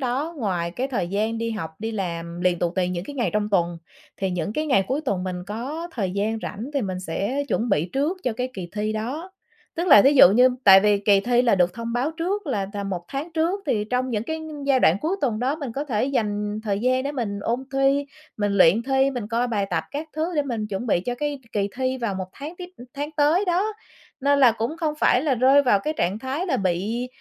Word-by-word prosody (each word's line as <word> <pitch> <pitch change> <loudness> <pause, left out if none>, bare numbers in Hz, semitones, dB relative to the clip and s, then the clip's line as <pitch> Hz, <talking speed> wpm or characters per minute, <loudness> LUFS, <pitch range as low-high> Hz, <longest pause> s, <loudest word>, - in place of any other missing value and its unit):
đó 275 +6 -2
ngoài 180 -7 -1
cái 255 +9 -3
thời 235 -10 -2
gian 215 +4 -1
đi 230 0 -2
học, 215 -8 -4
đi 225 +1 -3
làm 170 -3 -4
liền 180 -1 +2
tù 175 - 0
tì 180 -1 +1
những 180 0 -3
cái 290 - -8
ngày 240 - 0
trong 210 0 0
tuần, 175 -3 +1 0.4
thì 190 -1 -1
những 180 +3 -2
cái 310 +4 -2
ngày 195 -9 +3
cuối 270 +3 0
tuần 185 -2 -1
mình 180 -1 -4
có 275 +11 -5
thời 195 -6 -2
gian 210 +3 -1
rảnh 225 +7 -5
thì 275 - +1
mình 185 -3 -3
sẽ 200 +11 -2
chuẩn 235 +2 0
bị 165 -1 +1
trước 300 +8 0
cho 250 - +1
cái 250 +3 -3
kỳ 180 -3 -6
thi 215 +1 -2
đó. 270 +12 -4 0.5
Tức 345 +2 -1
là 210 -10 +9
thí 275 - +5
dụ 225 -9 +9
như 250 +5 +6 0.2
tại 195 -2 +9
vì 205 -1 +3
kỳ 200 -1 +4
thi 245 +3 +2
là 235 -4 +4
được 180 -1 +2
thông 230 0 -5
báo 255 +6 0
trước 375 +2 -2
là 205 -8 -1
tầm 200 -1 -4
1 175 -2 -4
tháng 290 +5 -5
trước, 335 +5 0
thì 210 -6 +1
trong 255 +1 0
những 215 -2 -1
cái 320 +2 -4 0.3
giai 265 -2 +3
đoạn 165 - +5
cuối 355 +5 -1
tuần 235 -6 0
đó 265 +6 0
mình 275 -7 -5
có 285 +4 -3
thể 240 -5 0
dành 210 -5 -1
thời 200 -2 0
gian 255 +1 +2
để 285 - -2
mình 205 -7 -3
ôn 240 +5 -2
thi, 275 +1 +2 0.3
mình 205 -1 0
luyện 195 +3 +5
thi, 270 +1 +2
mình 240 -5 -5
coi 240 +1 0
bài 205 -4 0
tập - - 0
các 305 +2 -5
thứ 320 +3 -2
để 295 - +3
mình 230 -6 -3
chuẩn 205 +5 -4
bị 185 - +2
cho 245 +7 -3
cái 290 +1 -3
k - - -49
kỳ 200 -1 0
thi 260 0 -1
vào 230 -5 -2
một 185 -1 -4
tháng 300 +5 -8
tiếp, 355 -1 -7
ưm, 245 - -12
tháng 290 +2 -4
tới 305 +7 +3
đó. 380 +5 +1 0.5
Nên 285 +1 +3
là 245 -4 +7
cũng 230 +8 -3
không 315 -3 -1
phải 250 - +4
là 285 -4 +2
rơi 265 +4 +5
vào 205 -7 +3
cái 305 +6 -2
trạng 190 +5 0
thái 270 +9 -3
là - - +1
bị 200 +6 -1
235 Hz, 255 wpm, -24 LUFS, 200-280 Hz, 0.5 s, là